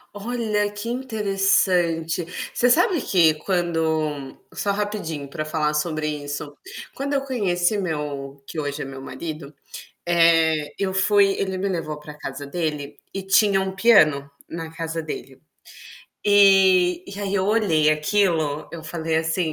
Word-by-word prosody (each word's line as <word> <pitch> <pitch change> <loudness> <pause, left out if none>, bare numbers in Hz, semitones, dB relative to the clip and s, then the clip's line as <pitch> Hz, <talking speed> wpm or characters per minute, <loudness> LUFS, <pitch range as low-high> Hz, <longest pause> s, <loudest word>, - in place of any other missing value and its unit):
Olha, 210 -1 -1
que 205 +3 -6
interessante. 195 -8 +1 0.3
Você 245 - +3
sabe 335 +3 +3
que 170 -8 +4
quando 160 -4 -1 0.2
só 200 - -1
rapidinho 200 -8 -3
pra 155 +3 -4
falar 155 -1 -1
sobre 155 0 -1
isso. 145 -1 -5 0.4
Quando 280 +1 -3
eu 275 - +1
conheci 205 -7 0
meu 145 -6 -4
que 160 - -6
hoje 145 0 -3
é - - -6
meu 135 0 -8
marido, 145 +2 -7 0.6
eh, 165 -3 +3
eu 190 -1 -1
fui 195 +1 +4
ele 190 -1 -2
me 195 +2 -1
levou 165 -5 -3
para 150 0 -11
casa 145 -1 -7
dele 150 -2 -3 0.2
e 195 - -5
tinha 195 0 +4
um 190 0 -2
piano 155 -10 +4 0.2
na 165 -1 -7
casa 165 0 -4
dele. 135 -4 -8 0.8
E 190 -3 +5
e 200 +1 -8
aí 200 -1 -2
eu 190 -1 +1
olhei 190 -8 +3
aquilo, 155 -2 +1
eu 170 -1 -7
falei 160 0 -2
assim: 160 0 0
170 Hz, 145 wpm, -23 LUFS, 155-200 Hz, 0.8 s, E